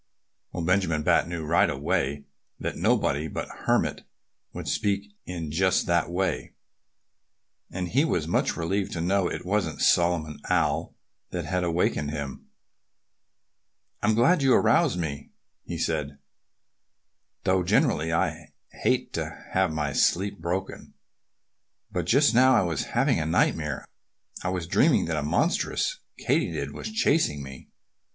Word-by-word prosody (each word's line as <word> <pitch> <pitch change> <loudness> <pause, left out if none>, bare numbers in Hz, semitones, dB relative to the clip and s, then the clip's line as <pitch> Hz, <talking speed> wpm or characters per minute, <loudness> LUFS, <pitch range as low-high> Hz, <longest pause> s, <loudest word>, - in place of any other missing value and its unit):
Well, 85 - -4
Benjamin 85 -3 +1
Bat - - +3
knew 85 -2 -4
right 85 +2 +3
away 70 +1 -1 0.3
that - - -3
nobody 75 +3 +1
but - - -5
the - - -10
Hermit - - +1 0.5
would - - -7
speak 100 0 -1 0.2
in 85 -4 -5
just 95 +3 +2
that 85 -1 +1
way. 95 +2 -2 1.1
And 90 -1 -4
he 135 - +3
was 85 - 0
much - - 0
relieved 95 +4 -1
to 85 - -3
know 95 +1 +1
that - - -3
it - - -14
wasn't 90 -6 -1
Solomon 85 -3 +2
Owl - - 0 0.3
that 90 -3 -4
had 90 +3 -1
awakened 85 -4 0
him. 70 -3 -6 1.5
"I'm 105 +1 +2
glad 135 +9 +4
you 135 -2 +5
roused 120 - +3
me," 75 -4 -5 0.3
he 85 - -5
said, 75 -3 -2 1.3
"though 95 0 +2
generally 90 - +2
I 80 - -1 0.3
hate - - +1
to - - -5
have 95 -2 +2
my 75 -2 -2
sleep 100 +7 +1
broken. 90 +3 -4 1.0
But 90 -2 -2
just 140 +6 +4
now 130 +2 +6
I 110 - +4
was 85 -5 -2
having - - +3
a 80 - -1
nightmare. 80 -4 0 0.6
I 90 - -1
was 90 -2 -2
dreaming 85 - +3
that 80 -1 -2
a - - 0
monstrous 160 - 0 0.2
Katydid - - -1
was - - -6
chasing 145 - +1
me. 65 -1 -11
85 Hz, 145 wpm, -26 LUFS, 80-100 Hz, 1.5 s, now